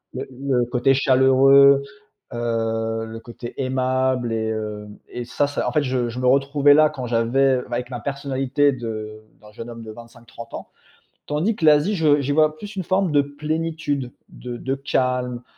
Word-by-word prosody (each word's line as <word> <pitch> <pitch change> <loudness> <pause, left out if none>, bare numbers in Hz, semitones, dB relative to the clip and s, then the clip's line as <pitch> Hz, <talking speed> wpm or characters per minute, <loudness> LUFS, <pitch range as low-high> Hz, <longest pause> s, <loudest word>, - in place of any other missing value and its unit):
Le - - -5
le 130 -1 -1
côté 125 +2 +2
chaleureux, 135 +1 +5 0.5
heu, 115 -1 -2
le 115 0 -8
côté 120 0 -9
aimable 130 -2 0
et 110 0 -1
heu 105 -1 -5 0.2
et 120 - -6
ça 145 +4 -1
ça 145 0 -3
en - - -5
fait, 150 - +1
je 125 -2 -2
me 130 - -2
retrouvais 140 +2 +4
là 155 +1 +5
quand 130 -4 -6
j'avais 125 +3 +2
avec 125 +1 -4
ma 120 - -4
personnalité 140 0 0
de 110 -4 -6 0.2
d'un 105 0 -16
jeune 115 +2 -9
homme 115 -1 -9
de 110 - -8
25-30 115 0 -12
ans. - - -9 0.6
Tandis 165 +9 0
que 165 - -8
l'Asie, 155 +7 +4
je 150 -4 +3
j'y 140 +1 -1
vois 155 0 +2
plus 205 +4 -9
une 190 - -3
forme 185 -1 0
de 145 - +5
plénitude, 150 -2 -3 0.2
de 120 -1 -8
de 135 +2 -3
calme, 125 -2 -1
130 Hz, 175 wpm, -22 LUFS, 120-145 Hz, 0.6 s, chaleureux